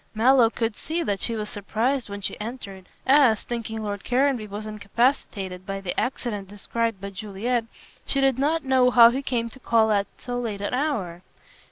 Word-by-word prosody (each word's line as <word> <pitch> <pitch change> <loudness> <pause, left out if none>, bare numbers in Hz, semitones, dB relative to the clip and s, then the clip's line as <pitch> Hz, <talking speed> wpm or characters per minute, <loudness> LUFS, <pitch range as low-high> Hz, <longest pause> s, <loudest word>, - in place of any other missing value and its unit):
Mallow 240 +1 +5
could 225 -1 -2
see 330 +7 -3
that 200 -7 -1
she 230 - 0
was 210 -1 -3
surprised 225 +5 -1
when 200 0 -6
she - - -2
entered, 200 -5 -7 0.2
as, 265 -5 +5
thinking 225 -2 -4
Lord 205 -1 -4
Caranby 250 -3 +1
was 205 +1 -6
incapacitated 205 -3 -1
by 195 0 -4
the 190 -2 -4
accident 225 -6 -3
described 225 +2 -2
by 200 +1 -6
Juliet, 215 +4 -2 0.4
she 275 - 0
did 270 -2 +2
not 310 +3 +1
know 260 -1 +4
how 235 -1 +8
he 265 +3 -2
came 240 -4 -1
to 265 - -12
call 225 -3 +3
at 200 -1 +2
so 245 -1 -4
late 215 -5 -4
an 205 - -2
hour. 225 - -1
225 Hz, 185 wpm, -25 LUFS, 205-255 Hz, 0.4 s, how